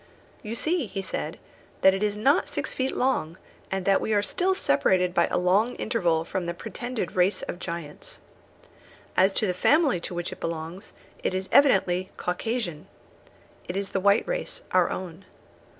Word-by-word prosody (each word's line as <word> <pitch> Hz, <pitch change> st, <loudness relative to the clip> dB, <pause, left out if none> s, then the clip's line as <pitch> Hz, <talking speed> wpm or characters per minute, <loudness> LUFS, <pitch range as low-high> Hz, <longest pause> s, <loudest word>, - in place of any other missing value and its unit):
"You 220 Hz, +1 st, -5 dB
see," 315 Hz, +1 st, 0 dB
he 195 Hz, 0 st, -4 dB
said, -, -, -4 dB, 0.4 s
"that 190 Hz, -, +7 dB
it 195 Hz, -, -2 dB
is 210 Hz, -1 st, 0 dB
not 275 Hz, -, +3 dB
six -, -, -3 dB
feet 260 Hz, 0 st, -1 dB
long, 185 Hz, -11 st, 0 dB, 0.3 s
and 190 Hz, -1 st, -2 dB
that 195 Hz, -1 st, +4 dB
we 220 Hz, -, 0 dB
are 205 Hz, -, +2 dB
still 370 Hz, -, +1 dB
separated 180 Hz, -, +2 dB
by 170 Hz, -, +3 dB
a -, -, -1 dB
long 195 Hz, +7 st, +2 dB
interval 170 Hz, -9 st, 0 dB
from 175 Hz, 0 st, -3 dB
the 170 Hz, -, -3 dB
pretended 240 Hz, -1 st, -5 dB
race 185 Hz, +2 st, +2 dB
of 175 Hz, -, -5 dB
giants. 170 Hz, -4 st, -7 dB, 1.0 s
As 190 Hz, +1 st, +3 dB
for -, -, +2 dB
the 180 Hz, -, 0 dB
family 285 Hz, -, +3 dB
to 175 Hz, -, -6 dB
which 175 Hz, 0 st, -3 dB
it -, -, -9 dB
belongs, 165 Hz, +4 st, -5 dB, 0.3 s
it 185 Hz, -, -1 dB
is 190 Hz, 0 st, -3 dB
evidently 190 Hz, -9 st, +4 dB
Caucasian. 180 Hz, -3 st, -3 dB, 0.8 s
It 180 Hz, -, -3 dB
is 200 Hz, -1 st, -2 dB
the 195 Hz, -, -1 dB
white 200 Hz, +2 st, +3 dB
race, -, -, -3 dB
our -, -, +4 dB
own. 180 Hz, 0 st, -6 dB
190 Hz, 175 wpm, -26 LUFS, 175-230 Hz, 1.0 s, that